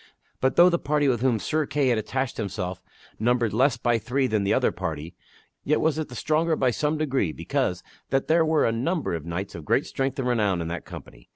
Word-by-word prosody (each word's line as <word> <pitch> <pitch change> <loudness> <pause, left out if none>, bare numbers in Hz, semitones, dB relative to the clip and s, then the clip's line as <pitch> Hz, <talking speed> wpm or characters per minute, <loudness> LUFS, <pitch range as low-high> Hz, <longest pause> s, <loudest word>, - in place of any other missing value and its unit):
But 130 0 +1
though 175 +1 +7
the 170 - +1
party 145 0 +1
with 120 -4 +1
whom 125 -3 +2
Sir 155 +6 -1
Kay 140 -3 +1
had 120 -3 +2
attached 130 +4 -3
himself 95 -4 -4 0.4
numbered 120 -1 +1
less 130 +3 +3
by 120 -1 +1
three 130 +4 0
than 110 -5 0
the 100 - +1
other - - +3
party, 80 +1 -5 0.5
yet 150 - +2
was 160 0 +1
it 155 - -3
the 125 - -9
stronger 160 +4 +1
by 130 -4 +2
some 150 +5 0
degree 135 - 0
because - - -2 0.3
that 135 0 +1
there 165 +1 +4
were 160 -1 +2
a - - +2
number 150 - -1
of 80 -1 -4
knights 90 +3 -4
of 85 - -8
great - - +1
strength 135 0 -2
and 130 -2 -1
renown 105 -7 +1
in 85 -1 -3
that 85 0 -5
company. - - -12
125 Hz, 225 wpm, -25 LUFS, 105-150 Hz, 0.5 s, though